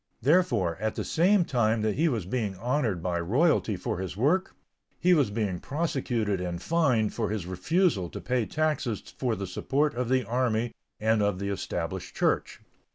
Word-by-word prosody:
Therefore, 125 Hz, -, +3 dB
at 110 Hz, 0 st, -2 dB
the -, -, -2 dB
same 180 Hz, +2 st, +3 dB
time 115 Hz, -5 st, +1 dB
that 110 Hz, -1 st, +1 dB
he 160 Hz, +7 st, +2 dB
was 115 Hz, -, -2 dB
being 105 Hz, -1 st, -2 dB
honored 115 Hz, -, -1 dB
by 90 Hz, -2 st, 0 dB
royalty 115 Hz, -, +2 dB
for 90 Hz, -, -3 dB
his 95 Hz, 0 st, -5 dB
work, 165 Hz, -, +1 dB, 0.4 s
he 180 Hz, +1 st, +4 dB
was 145 Hz, -9 st, +3 dB
being 100 Hz, -4 st, -2 dB
prosecuted 125 Hz, -, -1 dB
and 90 Hz, -1 st, -3 dB
fined 130 Hz, -, +1 dB
for 110 Hz, -3 st, -1 dB
his 105 Hz, -4 st, -3 dB
refusal 100 Hz, -, +1 dB
to -, -, -7 dB
pay 125 Hz, -3 st, -1 dB
taxes 150 Hz, -8 st, -1 dB
for 125 Hz, -4 st, -1 dB
the 100 Hz, -1 st, -4 dB
support 140 Hz, +11 st, 0 dB
of 125 Hz, 0 st, -2 dB
the 130 Hz, -2 st, +2 dB
army 120 Hz, 0 st, 0 dB, 0.3 s
and 110 Hz, 0 st, +2 dB
of 100 Hz, -2 st, +1 dB
the 100 Hz, +1 st, -3 dB
Established 100 Hz, -, -4 dB
Church. -, -, 0 dB
115 Hz, 175 wpm, -28 LUFS, 100-145 Hz, 0.4 s, he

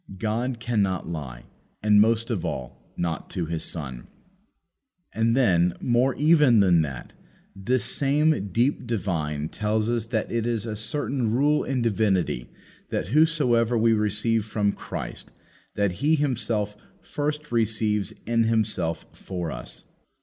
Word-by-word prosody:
God 115 Hz, +5 st, -2 dB
cannot 100 Hz, -8 st, 0 dB
lie, 70 Hz, -8 st, -6 dB, 0.4 s
and, 105 Hz, -1 st, +6 dB
most 115 Hz, +2 st, +2 dB
of 105 Hz, -7 st, -2 dB
all, 65 Hz, -1 st, -6 dB
not 85 Hz, -3 st, -3 dB
to 85 Hz, -, -2 dB
His 80 Hz, 0 st, -3 dB
Son." 65 Hz, -7 st, -5 dB, 1.1 s
And, 115 Hz, +2 st, +1 dB
then, 90 Hz, -8 st, +3 dB
more 125 Hz, +2 st, +2 dB
even 150 Hz, -6 st, +5 dB
than 90 Hz, -4 st, +5 dB
that. 70 Hz, -5 st, -5 dB, 0.4 s
This 120 Hz, +6 st, 0 dB
same 145 Hz, -2 st, +2 dB
deep 120 Hz, +5 st, +1 dB
divine 80 Hz, -9 st, -2 dB
tells 110 Hz, +1 st, -1 dB
us 115 Hz, -2 st, -1 dB
that 110 Hz, -2 st, -2 dB
it 115 Hz, 0 st, -1 dB
is 115 Hz, -2 st, -1 dB
a 110 Hz, -2 st, -4 dB
certain 125 Hz, +2 st, -2 dB
rule 145 Hz, +6 st, +2 dB
in 130 Hz, -3 st, -1 dB
divinity 100 Hz, -, 0 dB, 0.4 s
that, 90 Hz, +9 st, -3 dB
whatsoever 130 Hz, -7 st, +3 dB
we 115 Hz, 0 st, +4 dB
receive 105 Hz, +1 st, +1 dB
from 105 Hz, -1 st, 0 dB
Christ, -, -, -7 dB, 0.5 s
that 100 Hz, -2 st, +1 dB
He 155 Hz, +3 st, +4 dB
Himself 115 Hz, -7 st, -1 dB, 0.3 s
first 150 Hz, 0 st, -3 dB
receives 110 Hz, -3 st, +1 dB
in 115 Hz, 0 st, +2 dB
Himself 105 Hz, -7 st, 0 dB
for 90 Hz, -4 st, -5 dB
us. -, -, -9 dB
110 Hz, 135 wpm, -25 LUFS, 95-120 Hz, 1.1 s, and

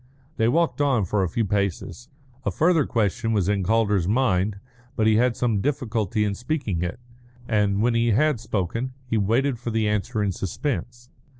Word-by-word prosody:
They 110 Hz, -, +2 dB
walked 160 Hz, +3 st, +1 dB
on 130 Hz, -8 st, +2 dB
for 100 Hz, +3 st, 0 dB
a 95 Hz, -, 0 dB
few 115 Hz, +6 st, -1 dB
paces. 100 Hz, -, -2 dB, 0.3 s
A -, -, 0 dB
further 165 Hz, -3 st, +2 dB
question 115 Hz, +1 st, 0 dB
was 100 Hz, -4 st, +1 dB
in 100 Hz, -1 st, +1 dB
Calder's 105 Hz, -3 st, +2 dB
mind, 105 Hz, -4 st, +1 dB, 0.4 s
but 110 Hz, -, +1 dB
he 110 Hz, -1 st, +4 dB
had 125 Hz, 0 st, +2 dB
some 115 Hz, -5 st, +1 dB
difficulty 115 Hz, -7 st, -1 dB
in 100 Hz, -, -1 dB
speaking 120 Hz, -, -2 dB
it, 90 Hz, +5 st, -3 dB, 0.5 s
and 105 Hz, -2 st, +1 dB
when 120 Hz, 0 st, +2 dB
he 115 Hz, 0 st, +2 dB
had 135 Hz, +4 st, +2 dB
spoken 115 Hz, +4 st, -3 dB
he 115 Hz, -3 st, 0 dB
waited 120 Hz, +5 st, +1 dB
for 120 Hz, -, -4 dB
the 110 Hz, -1 st, 0 dB
answer 105 Hz, +1 st, -1 dB
in 100 Hz, -, 0 dB
suspense. 120 Hz, -, -4 dB
110 Hz, 180 wpm, -24 LUFS, 100-125 Hz, 0.5 s, he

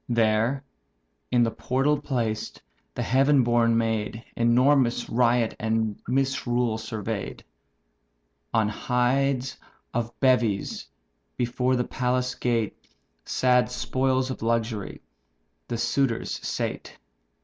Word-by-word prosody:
There 115 Hz, +3 st, +2 dB, 0.7 s
in 120 Hz, -1 st, +3 dB
the 115 Hz, -, +1 dB
portal 140 Hz, +5 st, 0 dB
placed, 115 Hz, -6 st, -2 dB, 0.4 s
the -, -, -2 dB
heaven 135 Hz, +2 st, +4 dB
born 115 Hz, -1 st, +3 dB
maid 110 Hz, 0 st, -1 dB
Enormous 125 Hz, +1 st, +3 dB
riot 120 Hz, -1 st, +2 dB
and 110 Hz, -1 st, 0 dB
misrule 125 Hz, -3 st, 0 dB
survey'd. 110 Hz, -2 st, -5 dB, 1.1 s
On 110 Hz, -2 st, +2 dB
hides 125 Hz, +4 st, 0 dB, 0.4 s
of 120 Hz, 0 st, -3 dB
beeves, 120 Hz, -7 st, +1 dB, 0.5 s
before 125 Hz, +1 st, +1 dB
the 125 Hz, -, +1 dB
palace 125 Hz, 0 st, -1 dB
gate 115 Hz, -3 st, -1 dB, 0.5 s
(Sad 125 Hz, -1 st, +2 dB
spoils 130 Hz, +1 st, 0 dB
of -, -, -6 dB
luxury), 115 Hz, -3 st, -2 dB, 0.7 s
the 120 Hz, -, -3 dB
suitors 120 Hz, 0 st, 0 dB
sate. -, -, -4 dB
120 Hz, 100 wpm, -26 LUFS, 115-130 Hz, 1.1 s, heaven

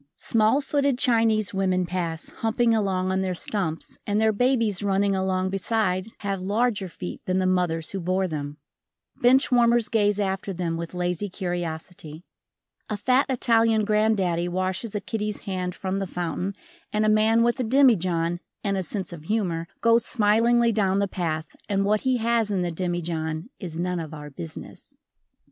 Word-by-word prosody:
Small 225 Hz, +5 st, +2 dB
footed 280 Hz, -2 st, +1 dB
Chinese 225 Hz, -5 st, +2 dB
women 185 Hz, -2 st, +1 dB
pass, 170 Hz, -2 st, -3 dB
humping 230 Hz, +1 st, +2 dB
along 190 Hz, -4 st, 0 dB
on 190 Hz, 0 st, +1 dB
their 185 Hz, -1 st, -1 dB
stumps 170 Hz, -4 st, -3 dB
and 205 Hz, +1 st, +1 dB
their 220 Hz, 0 st, +3 dB
babies 230 Hz, -3 st, +1 dB
running 200 Hz, 0 st, +1 dB
along 190 Hz, 0 st, 0 dB
beside 195 Hz, -1 st, 0 dB
have 195 Hz, -2 st, -2 dB
larger 205 Hz, +1 st, 0 dB
feet 90 Hz, -, -7 dB
than 185 Hz, 0 st, +1 dB
the 185 Hz, -, +1 dB
mothers 175 Hz, -3 st, 0 dB
who 195 Hz, -, -3 dB
bore 185 Hz, +2 st, 0 dB
them, 145 Hz, -3 st, -5 dB, 0.6 s
Bench 260 Hz, +3 st, +5 dB
warmers 240 Hz, -2 st, +4 dB
gaze 205 Hz, -2 st, +2 dB
after 195 Hz, 0 st, -2 dB
them 170 Hz, -2 st, -2 dB
with 170 Hz, +1 st, -6 dB
lazy 180 Hz, +3 st, -1 dB
curiosity. 175 Hz, -2 st, -5 dB, 0.7 s
A 210 Hz, -, -2 dB
fat 255 Hz, +6 st, +2 dB
Italian 225 Hz, -3 st, +3 dB
granddaddy 200 Hz, -5 st, +1 dB
washes 185 Hz, +4 st, -2 dB
a 205 Hz, -, -1 dB
kiddie's 210 Hz, 0 st, -3 dB
hand 185 Hz, -2 st, -3 dB
from 190 Hz, 0 st, -2 dB
the 195 Hz, -, -3 dB
fountain 180 Hz, +2 st, -3 dB, 0.4 s
and 215 Hz, 0 st, +1 dB
a -, -, +3 dB
man 220 Hz, +2 st, +4 dB
with 240 Hz, +2 st, +1 dB
a -, -, +1 dB
demijohn 185 Hz, -10 st, +3 dB, 0.2 s
and 200 Hz, -2 st, 0 dB
a -, -, 0 dB
sense 190 Hz, 0 st, -4 dB
of 155 Hz, -2 st, -10 dB
humor 175 Hz, -5 st, -1 dB
goes 230 Hz, 0 st, +4 dB
smilingly 230 Hz, +2 st, +3 dB
down 195 Hz, -3 st, +1 dB
the 200 Hz, 0 st, +1 dB
path 160 Hz, -4 st, -2 dB, 0.2 s
and 195 Hz, -1 st, +1 dB
what 210 Hz, +1 st, +2 dB
he 260 Hz, -1 st, +1 dB
has 230 Hz, -1 st, +1 dB
in 190 Hz, -3 st, 0 dB
the 175 Hz, -, -2 dB
demijohn 170 Hz, 0 st, -3 dB
is 170 Hz, -5 st, -6 dB
none 180 Hz, +1 st, -1 dB
of 160 Hz, -1 st, -6 dB
our 150 Hz, -1 st, -9 dB
business. 85 Hz, -, -10 dB
195 Hz, 170 wpm, -25 LUFS, 180-220 Hz, 0.7 s, Bench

